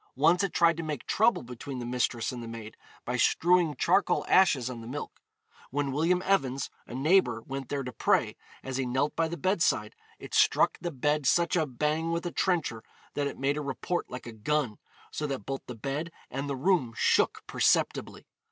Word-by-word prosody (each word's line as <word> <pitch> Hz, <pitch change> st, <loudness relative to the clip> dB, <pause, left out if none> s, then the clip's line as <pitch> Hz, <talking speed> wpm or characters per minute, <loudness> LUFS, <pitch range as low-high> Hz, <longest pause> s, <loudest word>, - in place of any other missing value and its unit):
Once 165 Hz, +7 st, +4 dB
it 195 Hz, -, 0 dB
tried 170 Hz, -1 st, +4 dB
to 165 Hz, -, -4 dB
make 155 Hz, -4 st, -4 dB
trouble 225 Hz, -, +2 dB
between 125 Hz, +2 st, -7 dB
the 120 Hz, -, -5 dB
mistress 120 Hz, -1 st, -1 dB
and 125 Hz, -2 st, -6 dB
the 115 Hz, -, -7 dB
maid 115 Hz, -1 st, -8 dB, 0.3 s
by 125 Hz, +1 st, -1 dB
strewing 170 Hz, +4 st, +3 dB
charcoal 185 Hz, +8 st, +2 dB
ashes 150 Hz, -10 st, +4 dB
on 125 Hz, -2 st, -6 dB
the 115 Hz, -, -9 dB
milk. 145 Hz, +4 st, -7 dB, 0.5 s
When 140 Hz, 0 st, -1 dB
William 170 Hz, +6 st, +1 dB
Evans, 135 Hz, -9 st, +1 dB, 0.2 s
a 120 Hz, -, -7 dB
neighbour, 135 Hz, -4 st, +3 dB
went 135 Hz, -1 st, -5 dB
there 140 Hz, -1 st, -2 dB
to 125 Hz, -, -5 dB
pray, -, -, +1 dB, 0.3 s
as 130 Hz, -1 st, -4 dB
he 135 Hz, -, 0 dB
knelt 130 Hz, +4 st, 0 dB
by 165 Hz, 0 st, +1 dB
the 170 Hz, +1 st, -5 dB
bedside, 170 Hz, -, +1 dB, 0.2 s
it -, -, -11 dB
struck -, -, +3 dB
the 175 Hz, -, -2 dB
bed 150 Hz, -1 st, 0 dB
such 170 Hz, +3 st, +3 dB
a 160 Hz, -3 st, +2 dB
bang 150 Hz, +5 st, -1 dB
with 170 Hz, +1 st, -2 dB
a 175 Hz, -, -2 dB
trencher 165 Hz, -, 0 dB, 0.3 s
that 145 Hz, -1 st, -1 dB
it -, -, -6 dB
made 140 Hz, +2 st, 0 dB
a -, -, -2 dB
report 145 Hz, +5 st, -3 dB
like 125 Hz, 0 st, -7 dB
a 120 Hz, -, -7 dB
gun, 120 Hz, +1 st, -1 dB, 0.3 s
so 150 Hz, -, -3 dB
that 135 Hz, -7 st, -4 dB
both 135 Hz, 0 st, -4 dB
the 125 Hz, -, -6 dB
bed 140 Hz, +8 st, -3 dB, 0.2 s
and 135 Hz, +3 st, -3 dB
the 140 Hz, -, -1 dB
room 130 Hz, -6 st, +1 dB
shook -, -, +2 dB
perceptibly. -, -, +1 dB
140 Hz, 200 wpm, -29 LUFS, 125-165 Hz, 0.5 s, Once